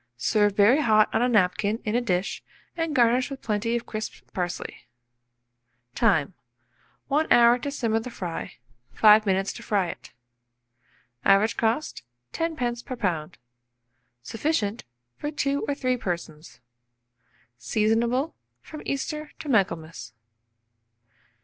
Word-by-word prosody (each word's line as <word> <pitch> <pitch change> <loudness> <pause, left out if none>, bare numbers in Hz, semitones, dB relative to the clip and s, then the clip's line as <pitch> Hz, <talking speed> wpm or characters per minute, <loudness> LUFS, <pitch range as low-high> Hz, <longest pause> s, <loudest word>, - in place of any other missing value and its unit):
Serve 205 - +2
very 225 +9 +5
hot 215 -5 +3
on - - +2
a 250 - +2
napkin 205 0 +2
in 210 - -1
a 240 - +2
dish, 185 -5 -1 0.3
and 330 -2 -2
garnish 245 +1 +3
with 275 -1 -7
plenty 220 +2 -1
of 235 - -3
crisped 215 0 -6
parsley. 180 -1 -5 1.1
Time. 185 - +2 0.8
1 300 +3 +1
hour 240 +1 +6
to 285 - -4
simmer 230 -5 0
the 225 - -7
fry, 180 -8 -6 0.4
5 215 0 +6
minutes 195 0 +1
to - - -10
fry 195 -4 0
it. - - -9 1.1
Average 200 +3 +4
cost, 230 +7 -1 0.3
10d. 250 -8 -2
per 255 - -6
lb. 175 -7 -2 0.9
Sufficient 225 - -2 0.3
for 295 - -3
2 280 -1 -1
or 285 - -1
3 255 -3 0
persons. 170 - -6 1.0
Seasonable 225 - +1 0.3
from 305 - -10
Easter 300 +2 -3
to 300 - -8
Michaelmas. 160 - -1
225 Hz, 125 wpm, -25 LUFS, 195-255 Hz, 1.1 s, hour